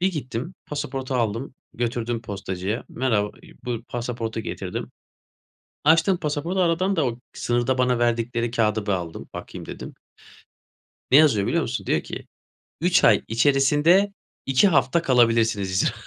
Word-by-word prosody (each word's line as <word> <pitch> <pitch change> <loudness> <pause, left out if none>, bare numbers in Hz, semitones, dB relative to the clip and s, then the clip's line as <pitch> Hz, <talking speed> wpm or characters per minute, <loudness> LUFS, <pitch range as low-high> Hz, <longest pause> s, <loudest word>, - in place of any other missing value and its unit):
Bir 190 +2 +2
gittim 135 +2 -5
pasaportu 135 -3 -4
aldım, 115 +3 -1 0.2
götürdüm 120 -1 -2
postacıya. 100 +1 -4
Merhaba, 115 -5 0
ııı - - -17
buyur 120 -2 -3
pasaportu 115 -2 -4
getirdim. - - -5 0.9
Açtım 165 +4 +4
pasaportu, 160 +4 -2
aradan 185 +3 +1
da 155 -5 +2
o 120 -1 -3
sınırda 120 +2 0
bana 125 -1 +2
verdikleri 120 0 0
kağıdı 110 -3 0
bir 105 - -1
aldım, 85 -3 -4
bakayım, - - -8
dedim. - - -8 1.2
Ne 135 - +8
yazıyor 125 -11 +5
biliyor - - +1
musun? - - -3
Diyor - - +1
ki, - - -8 0.5
"3 180 0 +3
ay 105 - +5
içerisinde 145 - +3 0.3
2 135 +9 +4
hafta 140 0 +3
kalabilirsiniz." 115 - +3
yazıyor. 95 0 +1
125 Hz, 140 wpm, -24 LUFS, 115-145 Hz, 1.2 s, Ne